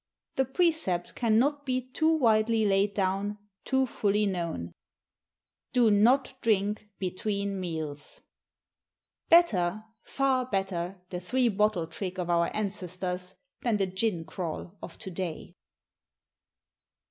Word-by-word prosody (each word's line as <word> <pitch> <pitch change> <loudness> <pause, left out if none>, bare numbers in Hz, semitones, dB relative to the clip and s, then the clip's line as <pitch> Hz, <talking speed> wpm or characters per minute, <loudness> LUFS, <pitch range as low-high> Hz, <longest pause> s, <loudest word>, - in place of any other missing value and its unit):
The 265 - +1
precept 265 - +1
cannot 250 +6 +2
be 255 -2 0
too 315 +4 +2
widely 225 -6 +3
laid 200 0 +2
down, 195 +1 0 0.3
too 265 0 +2
fully 210 -3 +1
known: 170 - -2 1.0
Do 240 -4 +5
not 245 +7 +4
drink 210 -1 +1
between 200 +1 -2
Meals! 155 -5 -5 1.1
Better, 215 - +4 0.2
far 265 -2 0
better 190 -3 -2
the 180 - -3
three 245 +7 +1
bottle 210 -4 +1
trick 185 +3 -5
of 175 -1 -1
our 170 0 +3
ancestors, 185 -2 -3 0.3
than 230 -4 +1
the 195 - +2
"gin 190 -2 -1
crawl" 175 +1 -5
of - - -9
to 195 -4 -7
day. 175 -1 -5
200 Hz, 115 wpm, -29 LUFS, 180-230 Hz, 1.1 s, Do